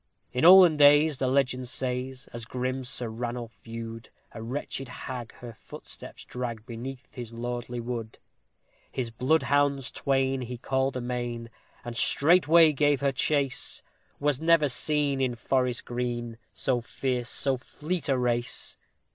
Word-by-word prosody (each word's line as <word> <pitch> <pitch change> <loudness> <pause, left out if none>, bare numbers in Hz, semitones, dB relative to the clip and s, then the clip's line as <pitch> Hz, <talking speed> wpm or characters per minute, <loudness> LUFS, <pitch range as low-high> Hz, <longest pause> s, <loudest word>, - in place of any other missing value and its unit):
In 125 - -1
olden 180 -3 +9
days, 145 0 +6
the 130 - +1
legend 130 -1 +1
says, 130 0 -2
as 120 -1 -6
grim 130 +2 -3
Sir 125 -1 -3
Ranulph 120 +1 -5
view'd 115 0 -7 0.2
A 115 - -8
wretched 130 +2 -4
hag 125 -1 -7
her 120 -1 -9
footsteps - - -10
drag 120 -3 -5
beneath 125 +2 -8
his 120 -3 -7
lordly 120 +1 -4
wood. 115 -2 -5 0.7
His 120 -3 -3
bloodhounds 140 +1 +1
twain 135 -1 0
he 125 0 -5
called 130 +1 -1
amain, 120 -1 -4 0.3
and 120 -1 -5
straightway 165 +3 +5
gave 145 -1 +2
her 140 -1 +2
chase; 135 0 0 0.4
Was 145 -1 +1
never 165 -3 +4
seen 145 +1 +1
in 125 -2 0
forest 125 +1 0
green, 120 -1 -3
so 125 -2 0
fierce, 125 0 -3
so 135 -1 +1
fleet 150 +4 -4
a 135 - +3
race! 120 -1 -1
125 Hz, 140 wpm, -27 LUFS, 120-140 Hz, 0.7 s, olden